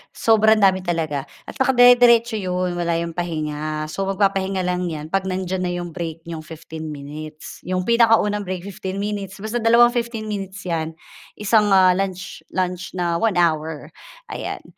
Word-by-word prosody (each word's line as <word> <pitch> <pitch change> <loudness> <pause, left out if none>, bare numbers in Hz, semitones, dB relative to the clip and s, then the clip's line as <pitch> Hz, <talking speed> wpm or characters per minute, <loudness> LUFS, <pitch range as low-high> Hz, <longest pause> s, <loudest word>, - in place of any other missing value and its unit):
sobrang 220 -1 +4
dami 190 -1 +5
talaga 160 -6 -2 0.2
at - - -11
naka-dire-diretso 245 -3 +5
'yon, 180 -1 -1
wala 170 -1 0
'yong 170 0 -2
pahinga. 155 -2 -3
So 195 +1 -3
magpapahinga 195 -1 0
lang 180 0 -1
'yan 155 -1 -6
'pag 195 0 0
nandiyan 185 0 -2
na 180 - -1
'yong 175 -1 -5
break, 165 -1 -6
nyong 165 -1 -6
15 160 0 -9
minutes. 150 +1 -8
'Yong 185 0 -1
pinakaunang 225 -3 +3
break 185 -1 -4
15 190 -1 -6
minutes, 200 -1 -4
basta 230 +2 -2
dalawang 235 +1 +5
15 235 -2 -3
minutes 195 -2 -5
'yan, 165 -2 -3 0.4
isang, 210 0 +2
ah, 185 -1 +6
lunch 185 0 -3 0.2
lunch 185 0 -2
na 170 -2 0
1 220 -4 +1
hour, 160 -2 0 0.4
ayan. - - -5
185 Hz, 160 wpm, -21 LUFS, 165-205 Hz, 0.4 s, ah